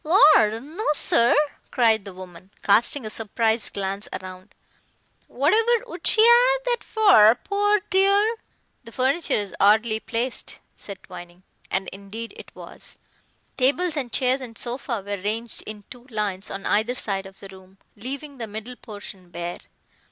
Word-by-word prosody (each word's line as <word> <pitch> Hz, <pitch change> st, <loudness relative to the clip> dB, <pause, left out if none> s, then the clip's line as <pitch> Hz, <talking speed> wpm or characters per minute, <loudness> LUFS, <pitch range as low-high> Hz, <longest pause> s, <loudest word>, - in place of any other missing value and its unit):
"Lor 300 Hz, -, +5 dB
no, 310 Hz, -, -7 dB
sir," 235 Hz, -4 st, +3 dB, 0.3 s
cried 225 Hz, -4 st, +2 dB
the 195 Hz, -, -9 dB
woman, 185 Hz, 0 st, -12 dB
casting 230 Hz, +5 st, +3 dB
a -, -, -4 dB
surprised 225 Hz, +1 st, 0 dB
glance 195 Hz, +1 st, -3 dB
round, 185 Hz, 0 st, -12 dB, 0.7 s
"whatever 450 Hz, -, +2 dB
would 350 Hz, -7 st, -5 dB
she 435 Hz, -, +5 dB
'ave -, -, +6 dB
that 480 Hz, -, -2 dB
for, 375 Hz, -, +6 dB
pore 410 Hz, -, +1 dB
dear?" 400 Hz, +4 st, +3 dB, 0.5 s
"The 230 Hz, -, -12 dB
furniture 265 Hz, +8 st, +1 dB
is 205 Hz, -2 st, -3 dB
oddly 220 Hz, +2 st, +4 dB
placed," 240 Hz, +3 st, -3 dB, 0.2 s
said 200 Hz, -2 st, -10 dB
Twining. 175 Hz, 0 st, -12 dB, 0.3 s
And 190 Hz, -1 st, -2 dB
indeed 200 Hz, +4 st, -9 dB
it -, -, -11 dB
was. -, -, -8 dB, 0.6 s
Tables 300 Hz, +6 st, +2 dB
and 260 Hz, -5 st, -3 dB
chairs 255 Hz, +3 st, +2 dB
and 230 Hz, -3 st, -9 dB
sofa 240 Hz, -3 st, -4 dB
were 205 Hz, 0 st, -3 dB
ranged 220 Hz, +3 st, -2 dB
in 210 Hz, -1 st, -7 dB
two 245 Hz, 0 st, -12 dB
lines 210 Hz, -4 st, -3 dB
on 195 Hz, 0 st, -6 dB
either 220 Hz, +4 st, +1 dB
side 195 Hz, -5 st, -3 dB
of 195 Hz, -, -16 dB
the 195 Hz, -, -10 dB
room, 190 Hz, 0 st, -16 dB, 0.2 s
leaving 275 Hz, +5 st, -7 dB
the 225 Hz, -, -4 dB
middle 220 Hz, +4 st, -8 dB
portion 205 Hz, -4 st, -11 dB
bare. 175 Hz, 0 st, -6 dB
230 Hz, 150 wpm, -23 LUFS, 200-285 Hz, 0.7 s, ave